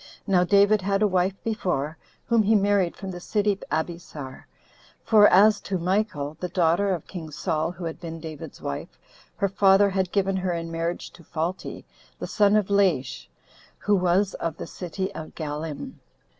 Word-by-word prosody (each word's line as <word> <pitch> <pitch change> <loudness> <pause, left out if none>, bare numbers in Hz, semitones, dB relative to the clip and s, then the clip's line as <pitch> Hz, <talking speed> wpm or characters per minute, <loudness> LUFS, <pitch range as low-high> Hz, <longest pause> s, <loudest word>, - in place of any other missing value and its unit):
Now 185 -3 +3
David 200 +2 +4
had 195 +2 +1
a - - +5
wife 185 0 +1
before, 175 -9 -1 0.3
whom 230 -1 +3
he 215 +1 +3
married 200 -3 +2
from 195 -2 -6
the 175 - -7
city 205 +1 0
Abesar; 155 -4 -4 0.6
for 210 -2 +6
as 205 +3 +5
to 195 - -2
Michal, 175 -5 -1
the 180 - -3
daughter 175 +3 +2
of 175 -5 -3
king 165 -4 -7
Saul, 155 +2 -1
who 180 -1 -7
had 160 - -5
been 165 -1 -7
David's 155 -2 -9
wife, 70 - -5 0.4
her 200 - +1
father 195 +1 +4
had 190 -2 -1
given 195 -1 +1
her 185 -1 -1
in 165 0 -4
marriage 165 +1 -3
to 170 - -16
Phalti, 165 +4 -4 0.3
the - - -5
son 205 0 +3
of 205 -2 +1
Laish, 175 -11 +1 0.5
who 205 - +2
was 185 +2 +2
of 165 -1 -4
the - - -6
city 190 +2 -5
of 155 - -8
Gallim. 155 - -5
185 Hz, 170 wpm, -25 LUFS, 165-200 Hz, 0.6 s, for